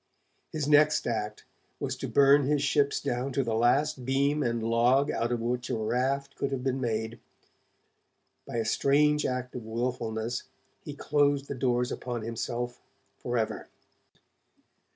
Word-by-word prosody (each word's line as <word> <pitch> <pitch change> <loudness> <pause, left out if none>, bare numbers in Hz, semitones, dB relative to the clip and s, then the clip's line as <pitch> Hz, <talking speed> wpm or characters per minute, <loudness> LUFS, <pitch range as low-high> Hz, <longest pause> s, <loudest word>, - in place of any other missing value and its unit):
His 150 -3 -2
next 150 +1 +4
act 105 -2 -3 0.3
was - - -2
to - - -4
burn 140 0 +5
his 145 -1 +1
ships 140 -1 +2
down 125 +3 -2
to 135 - +1
the 115 -2 -2
last 130 +5 +2
beam 140 +3 +1
and 115 -3 -1
log 120 +5 +3
out 115 +1 -1
of 120 -1 -1
which 125 +1 -2
a - - 0
raft 135 +5 -1
could 140 - -2
have 130 -2 -3
been 130 0 -1
made. 110 -1 -2 1.3
By - - -6
a 115 - 0
strange 150 +6 +3
act 125 0 -3
of 125 - -6
wilfulness, 115 0 -3 0.4
he - - -7
closed 145 -1 +1
the - - -4
doors 125 -2 0
upon 120 -3 -4
himself 120 +2 -4 0.4
forever. 120 -3 -2
125 Hz, 150 wpm, -28 LUFS, 115-140 Hz, 1.3 s, burn